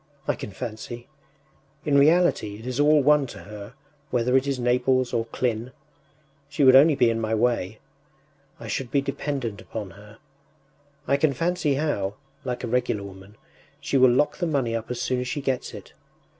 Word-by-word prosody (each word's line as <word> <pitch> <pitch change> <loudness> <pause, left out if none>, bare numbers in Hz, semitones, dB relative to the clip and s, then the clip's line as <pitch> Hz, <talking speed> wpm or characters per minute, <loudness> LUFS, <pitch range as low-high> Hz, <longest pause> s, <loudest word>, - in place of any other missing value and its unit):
I - - +2
can - - -7
fancy... 120 +3 -7 0.8
In 145 - +2
reality 145 - +3
it 110 - -12
is 125 +1 -4
all 150 0 +5
one 150 -1 +4
to - - -10
her, 105 +3 -10 0.3
whether 125 +1 +1
it 135 +1 +3
is 140 -1 -1
Naples 125 +1 +1
or 115 -1 0
Klin. 120 +1 -2 0.8
She 145 0 0
would 130 -1 +7
only 145 +3 +7
be 120 -3 +3
in 115 0 -2
my 110 0 0
way. 110 -3 0 0.8
I - - -8
should 130 -3 -3
be 140 - +2
dependent 135 -6 -4
upon 105 -4 -7
her. 105 +2 -15 0.9
I 140 - +3
can 140 0 +2
fancy 165 0 0
how, 105 -10 -1 0.3
like 125 -2 -4
a - - -2
regular 120 -4 0
woman, 95 +1 -12 0.4
she - - -3
will 130 -1 +6
lock 130 +5 +2
the 175 - -1
money 135 -7 0
up 115 -1 -5
as 125 -1 -4
soon 125 0 -1
as 125 - -3
she 145 - -3
gets 135 -2 -2
it.... - - -11
125 Hz, 185 wpm, -25 LUFS, 115-140 Hz, 0.9 s, would